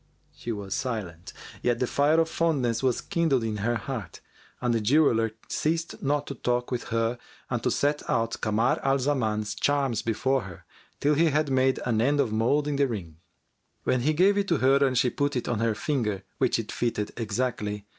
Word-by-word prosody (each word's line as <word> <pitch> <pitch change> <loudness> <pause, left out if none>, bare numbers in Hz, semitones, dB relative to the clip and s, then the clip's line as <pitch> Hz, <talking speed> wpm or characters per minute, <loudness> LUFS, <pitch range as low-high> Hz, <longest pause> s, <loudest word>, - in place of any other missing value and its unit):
She 120 - -6
was 100 -3 -4
silent, 95 -9 -4 0.3
yet 120 -1 +1
the 125 - 0
fire 145 +5 +2
of 165 - +3
fondness 140 -9 0
was 130 -3 +1
kindled 155 -8 +1
in 110 -2 -2
her 115 +4 0
heart. 115 - -5 0.4
And 120 -1 0
the 115 - +1
jeweller 115 -3 +3
ceased 165 +2 -2
not 145 +1 0
to - - -5
talk 125 -1 -1
with 125 -1 -2
her 115 +1 -1 0.3
and - - 0
to - - +1
set 145 +1 +1
out 115 0 0
Kamar 110 +2 +1
al 135 0 +2
Zaman's 110 -7 0
charms 135 0 0
before 130 +4 0
her 95 -5 -11 0.3
till 145 +1 +3
he 160 +3 +3
had 150 -2 +1
made 130 0 +2
an 115 -3 +1
end 145 +4 +2
of 125 -6 +1
moulding 145 +6 +1
the 140 0 +3
ring; 90 -10 -6 0.7
when 125 - +1
he 155 +5 +2
gave 195 +6 +4
it 200 - -1
to 170 - +2
her 135 +2 +4
and 130 -2 +2
she 125 0 +3
put 145 0 -1
it 125 - -2
on 120 -3 -1
her 115 -1 +1
finger, 105 -8 -1 0.2
which - - +2
it - - -4
fitted 115 -3 -2
exactly. 105 -2 -2
125 Hz, 195 wpm, -27 LUFS, 110-145 Hz, 0.7 s, gave